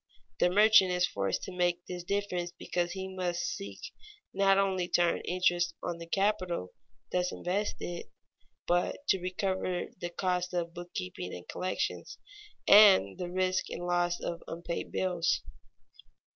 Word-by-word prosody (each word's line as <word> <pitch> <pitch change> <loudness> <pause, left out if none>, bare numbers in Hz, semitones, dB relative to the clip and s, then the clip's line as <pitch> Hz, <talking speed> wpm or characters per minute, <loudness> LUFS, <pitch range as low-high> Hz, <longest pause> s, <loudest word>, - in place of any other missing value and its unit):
The 180 - +4
merchant 210 0 +6
is 180 0 +2
forced 100 - -2
to - - -6
make 175 -1 0
this 180 -1 -6
difference 180 -2 -2
because 175 0 -2
he 190 0 -4
must 180 -2 -2
seek 100 0 -5 0.5
not 195 0 +4
only 190 -2 +1
to 175 - +2
earn 170 - +1
interest 175 -1 +1
on 170 -1 -3
the 170 - -8
capital 185 - 0 0.4
thus 180 0 0
invested, 180 -2 -3 0.6
but 175 +11 0
to 190 - +3
recover 185 0 -2
the 175 - -3
costs 180 0 -1
of 170 -1 -2
bookkeeping 90 - -6
and 90 - -10
collections, 185 0 -3 0.5
and 195 - +7
the 180 - -3
risk 185 +1 0
and 175 - -5
loss 175 0 +1
of 170 0 -4
unpaid 170 +1 -5
bills. 180 -2 0
180 Hz, 145 wpm, -30 LUFS, 175-185 Hz, 0.6 s, and